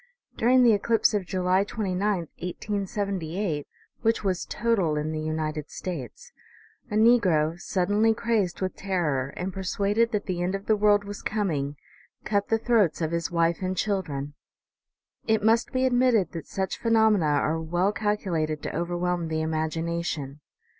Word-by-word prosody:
During 250 +2 +4
the 235 -2 +6
eclipse 225 +2 +2
of 200 -4 -1
July 185 0 +2
29, 195 -3 -3 0.2
1878, 185 -1 -3 0.3
which 225 -1 +1
was 185 -3 -1
total 210 -9 +1
in 150 +1 -2
the 155 0 -3
United 155 -1 -3
States, 160 - -7 0.6
a 210 - -3
negro, 185 -8 +4
suddenly 205 +5 +2
crazed 220 -6 0
with 185 0 -2
terror, 150 -9 -1
and 185 +1 -3
persuaded 200 +4 0
that 210 -1 -1
the 180 -3 -2
end 180 +2 0
of 195 0 -6
the 220 - +3
world 205 0 +4
was 205 0 -7
com 205 -3 -1
ing, 140 -1 -2 0.5
cut 200 -1 0
the 225 - +2
throats 220 -7 +2
of 160 -1 -1
his 170 -2 -1
wife 170 0 +1
and 185 0 -2
children. 155 -9 -2 0.9
It 220 -1 +2
must 225 +2 +3
be 260 0 +1
admitted 245 -7 +3
that 165 - -7
such 190 -2 -3
phenomena 220 -6 +3
are 150 +2 +1
well 175 +5 +1
cal 210 0 0
culated 155 -6 -2
to - - -4
overwhelm 175 0 -1
the 160 0 -1
imagination. 160 -2 -2
185 Hz, 155 wpm, -26 LUFS, 160-210 Hz, 0.9 s, the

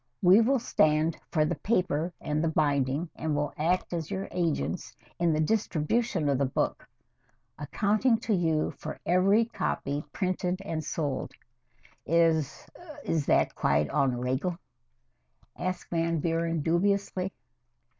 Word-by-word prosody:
"We 185 +5 +7
will 265 +4 +3
stand 155 -8 +2
for 155 -3 +2
the - - 0
paper 180 -6 0
and 150 +1 -1
the - - +2
binding, 145 0 0
and 155 -2 -2
will 145 0 -1
act 175 +4 0
as 165 -3 -3
your 190 +1 -3
agents 165 - -2 0.2
in 170 -1 +3
the 155 - +1
distribution 185 0 0
of 140 -2 +1
the 140 - +3
book, 130 - -2 0.7
accounting 215 - +1
to 225 - 0
you 160 -4 +1
for 155 - -6
every 195 +6 +4
copy 150 -9 -2
printed 185 +1 -1
and 160 -4 -3
sold." 145 -2 -3 0.7
"Is 160 -3 +2 0.4
is 155 -4 -1
that - - +3
quite 75 0 +1
en 130 -3 +2
regle?" 130 +8 -1 1.0
asked 180 0 -4
Van 165 0 +1
Buren 165 0 0
dubiously. 190 +2 0
165 Hz, 135 wpm, -28 LUFS, 150-185 Hz, 1.0 s, We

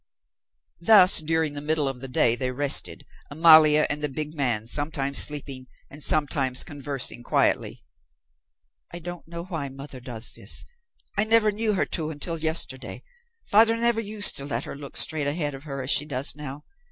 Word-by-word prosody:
Thus 190 0 +7
during 160 -1 -1
the 145 - -6
middle 150 -1 0
of 135 -2 -5
the 135 - -6
day 120 -2 +2
they 130 +1 -3
rested, 140 +2 0 0.2
Amalia 155 0 +6
and 145 0 -4
the 150 - 0
big 150 +3 -5
man 125 -8 -1
sometimes 140 +1 +1
sleeping 140 -3 0 0.2
and 145 +2 -11
sometimes 140 -4 +2
conversing 140 -5 -5
quietly. - - 0 1.1
"I 175 - -8
don't 175 0 -9
know 170 0 -7
why 160 -6 -5
mother 135 0 -10
does 120 -2 -4
this. - - -2 0.5
I - - +4
never 220 -1 +3
knew 215 +1 -1
her - - 0
to 155 -3 -4
until 160 +2 -3
yesterday. 155 -5 -2 0.4
Father 225 +2 +4
never 235 -1 +2
used 210 -1 -2
to 140 - -3
let 125 -2 -3
her - - -8
look 140 -1 -10
straight 150 -2 -1
ahead 145 0 -1
of 135 +2 -11
her 140 -2 -6
as 130 - +1
she 150 - +4
does 135 -1 -1
now. 150 -1 -9
150 Hz, 175 wpm, -24 LUFS, 135-165 Hz, 1.1 s, Thus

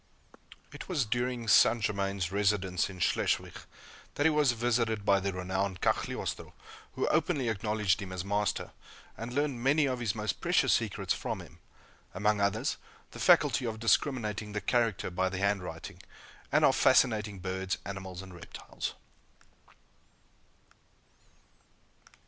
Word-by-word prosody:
It - - -9
was 150 -9 +1
during 120 +1 -2
St. 115 +2 +6
Germain's 100 -4 -1
residence 100 -3 +1
in 95 - -9
Schleswig - - 0 0.6
that 145 - 0
he 160 - +6
was 150 -5 +3
visited 115 -3 0
by 100 -2 +4
the 100 +1 -2
renowned 95 +1 -2
Cagliostro, - - -2 0.4
who - - -1
openly 150 -5 +1
acknowledged 105 -3 0
him 95 -1 -6
as 95 0 -4
master, 100 0 -1 0.4
and 115 +2 -6
learned 140 -2 -1
many 145 +3 +4
of 130 -2 -1
his 115 -4 -1
most 110 0 -3
precious - - +3
secrets - - 0
from - - -4
him - - -13 0.6
among 105 +1 +1
others, 100 +2 0 0.3
the - - -10
faculty 125 - +4
of 110 -1 -3
discriminating 110 -3 0
the 105 - -1
character 115 -7 0
by 95 +1 0
the 95 - -5
handwriting, 95 -4 -3 0.5
and - - +4
of - - +4
fascinating 105 -3 +3
birds, 95 +1 -3
animals, 95 -1 -6
and 95 -1 -11
reptiles. 85 - -7
105 Hz, 135 wpm, -30 LUFS, 95-120 Hz, 0.6 s, St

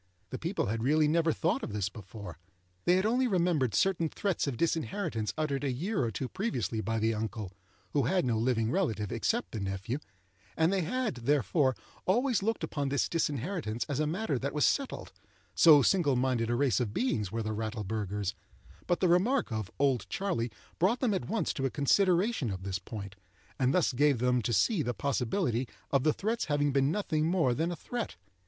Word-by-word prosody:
The 130 - -4
people 170 +5 -1
had 110 +3 -2
really 150 +5 +3
never 165 +1 +3
thought 135 - 0
of 105 - -5
this 100 -2 0
before. 100 -3 -9 0.5
They 180 - +5
had 190 +2 +2
only 250 +4 +2
remembered 170 - +1
certain 170 - +2
threats 195 -4 -1
of 130 -4 -2
disinheritance 165 - -1
uttered 145 -3 -1
a 140 - 0
year 175 - -1
or 115 - 0
two 130 +4 -4
previously 125 - -2
by 115 +1 -1
the 110 +1 +1
uncle 105 -2 -4 0.4
(who 140 -4 +1
had 180 +3 +2
no 115 -3 +1
living 115 -1 +1
relative 110 - 0
except 225 - -1
the 110 - -4
nephew), 100 +7 -3 0.6
and 160 +3 +3
they 195 - +1
had, 250 +8 -1
therefore, 130 - +2 0.3
always 240 +4 +2
looked 225 -2 -1
upon 145 -3 -2
this 140 -1 +1
disinheritance 150 - -2
as 140 -1 -2
a 155 - +1
matter 165 - -1
that 140 +3 -3
was 150 - +3
settled—so 165 - +2
single 160 -7 +3
minded 125 -2 +1
a 120 - +1
race 130 -1 +2
of 115 -4 -2
beings 110 - 0
were 115 +1 -2
the 110 0 -2
Rattleburghers; 105 -2 -3 0.5
but 175 - +1
the 185 - +4
remark 195 - +2
of 110 -4 -3
"Old 135 -4 +1
Charley" 175 - -1 0.3
brought 200 +9 +3
them 240 -5 +1
at 190 - -3
once 225 +1 0
to 135 -1 -1
a - - -3
consideration 180 - +2
of 95 -2 -5
this 95 -1 -2
point, 100 0 -8 0.4
and 130 -1 +3
thus 165 -4 +2
gave 145 +1 +3
them 125 +1 +2
to 120 - -2
see 155 - +2
the 120 -4 -2
possibility 130 - 0 0.2
of 140 -2 +3
the 155 - +4
threats 220 +8 -1
having 145 -2 +1
been 135 0 +2
nothing 160 -5 0
more 165 -8 +2
than 165 +7 -1
a - - -3
threat. 240 +8 -5
140 Hz, 195 wpm, -30 LUFS, 115-180 Hz, 0.6 s, They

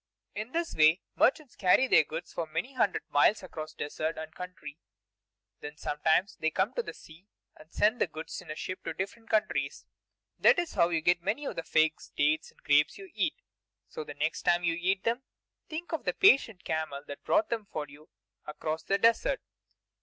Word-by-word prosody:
In 215 +4 -5
this 335 +2 -2
way 155 +4 +4
merchants 280 -1 +2
carry 195 +7 +4
their - - +6
goods 160 +3 -7
for 165 - -3
many 165 - -3
hundred 220 -7 +1
miles 195 +9 +4
across 155 -4 -7
desert 155 +2 -3
and 160 0 -7
country. 170 -5 -9 0.8
Then 145 +1 -8
sometimes 160 +7 +1
they 160 - +1
come - - 0
to 485 - 0
the - - -8
sea 165 +5 -16 0.3
and 155 +1 -17
send 220 +4 +2
the - - +4
goods 160 +2 -7
in 180 - -16
ships 185 +3 -5
to - - -3
different 220 +4 -5
countries. 210 -11 0 0.5
That - - +6
is 345 -1 -1
how 170 - +3
you 165 -2 0
get 175 +2 +3
many 210 +11 -2
of - - -4
the - - -2
figs, 160 -1 +1
dates, 155 +2 +2
and - - -24
grapes 145 +1 +3
you 390 -2 -11
eat; - - 0 0.5
so 470 - -6
the 445 - -9
next - - -1
time 175 0 +2
you 170 -1 +2
eat 185 +3 0
them, 235 +3 0 0.5
think 330 +2 -6
of 325 - -3
the - - +1
patient 265 - +4
camel 155 -3 -3
that 145 - -9
brought 320 +1 +2
them 225 -3 -2
for 150 -1 -4
you 145 +2 -16 0.4
across 155 +1 -3
the 195 - +1
desert. 365 - +3
175 Hz, 195 wpm, -30 LUFS, 155-230 Hz, 0.8 s, their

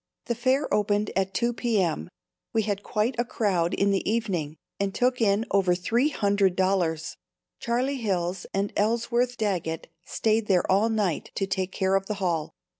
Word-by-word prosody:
The 240 - 0
fair 260 +4 +1
opened 205 0 +1
at 195 0 +1
2 240 +2 +1
p.m. 195 - 0 0.4
We 225 - +2
had 200 -1 -2
quite 215 +4 0
a - - +4
crowd 185 -8 0
in 200 0 +2
the 195 0 0
evening 185 -10 -1 0.2
and 200 0 -1
took 250 0 +1
in 210 +1 +3
over 185 -3 +3
three 230 +10 +1
hundred 200 -7 +2
dollars. 180 -4 0 0.4
Charlie 255 +4 0
Hills 185 -5 -2
and 200 +1 -1
Ellsworth 235 +3 +1
Daggett 180 -7 -2
stayed 220 +2 0
there 185 -3 +3
all 205 +4 +3
night 210 -7 -1
to 195 - 0
take 190 -1 -2
care 190 0 0
of 195 0 +1
the 210 - -2
hall. 170 -5 -2
200 Hz, 170 wpm, -26 LUFS, 185-230 Hz, 0.4 s, a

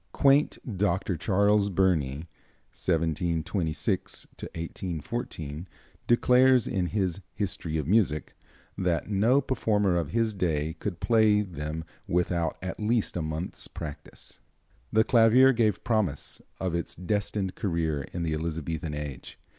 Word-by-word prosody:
Quaint 140 +1 +4 0.2
Dr. 95 -1 +1
Charles 100 +4 +2
Burney 85 -6 +1 0.5
(1726 80 -1 -1
1814) 85 -1 -5 0.4
declares, 125 0 +5
in 90 -2 0
his 95 -2 -1
"History 90 -5 -2
of 75 -3 -2
Music," 90 -7 +2 0.4
that 90 +1 -1
no 110 +7 +4
performer 105 -8 +1
of 85 -4 -1
his 115 +1 +1
day 80 -5 -1
could 95 -5 -4
play 110 -3 +4
them 80 -3 -5 0.2
without 85 -2 0
at 95 - -4
least 110 +1 0
a 90 - -1
month's 80 +3 -4
practice. 75 -4 -8 0.5
The 110 +1 +4
clavier 120 +4 +6
gave 110 -4 +1
promise 105 - -1 0.2
of 95 -3 -2
its 85 -1 -3
destined 95 +1 -1
career 80 -7 -1
in 85 - -3
the 80 -2 -1
Elizabethan 80 -1 -3
age. 75 -3 -7
90 Hz, 120 wpm, -28 LUFS, 80-105 Hz, 0.5 s, clavier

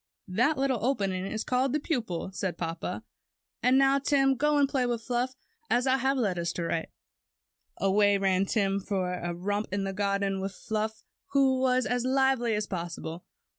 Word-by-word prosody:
^^That 250 +11 +2
little 265 -4 0
opening 195 -7 0
is 220 +2 -3
called 255 +2 +1
a - - +2
pupil," 225 - -2
said 185 -2 -3
papa. 165 -1 -4 0.6
''And 250 +1 +5
now, 275 0 +4
Tim, 275 -1 +3
go 295 +3 +2
and 285 -1 +4
play 260 -2 0
with 235 -2 -2
Fluff, 250 +1 -1 0.3
as 245 +1 +2
I 265 0 +3
have 270 +1 +1
letters 180 -8 0
to 175 - -3
write." 165 -1 -2 0.9
Away 200 +1 +3
ran 195 0 +2
Tim 200 -2 +1
for 190 -2 -2
a 175 -1 -3
romp 205 +4 -2
in 200 0 -1
the 195 0 -3
garden 200 -1 0
with 195 0 -3
Fluff, 220 +2 -3 0.3
who 265 -2 +4
was 255 -1 +2
as 245 -1 0
lively 260 -3 +2
as 210 0 -1
possible. 170 -3 -5
220 Hz, 175 wpm, -28 LUFS, 195-260 Hz, 0.9 s, And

